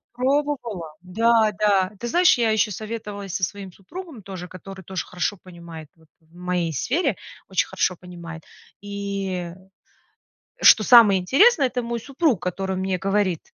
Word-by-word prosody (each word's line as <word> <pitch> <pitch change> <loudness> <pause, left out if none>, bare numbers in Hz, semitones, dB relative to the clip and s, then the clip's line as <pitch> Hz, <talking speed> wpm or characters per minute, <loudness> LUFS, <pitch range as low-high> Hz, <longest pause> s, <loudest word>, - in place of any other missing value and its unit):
Пробовала. 250 - -2
Да-да. 210 -1 +2
Ты 240 - -4
знаешь, 355 +5 +4
я 230 -2 +2
ещё 215 0 +2
советовалась 210 -2 -6
со 185 - -3
своим 190 +1 -4
супругом 300 - -10
тоже, 190 -2 -8
который 190 +2 -11
тоже 185 +1 -5
хорошо 180 +3 -2
понимает 170 -4 -12
вот 160 -1 -25
в 160 +1 -27
моей 180 -2 -2
сфере, 260 - -1 0.3
очень - - +1
хорошо 185 - 0
понимает. 170 -2 -10 0.4
И 200 -3 -4 1.1
что 215 - +7
самое 220 -4 +7
интересное, 280 - +4
это 250 -1 -3
мой 235 0 -3
супруг, 275 - 0
который 190 +1 -3
мне 190 0 -1
говорит: 195 -2 0
195 Hz, 140 wpm, -23 LUFS, 180-235 Hz, 1.1 s, что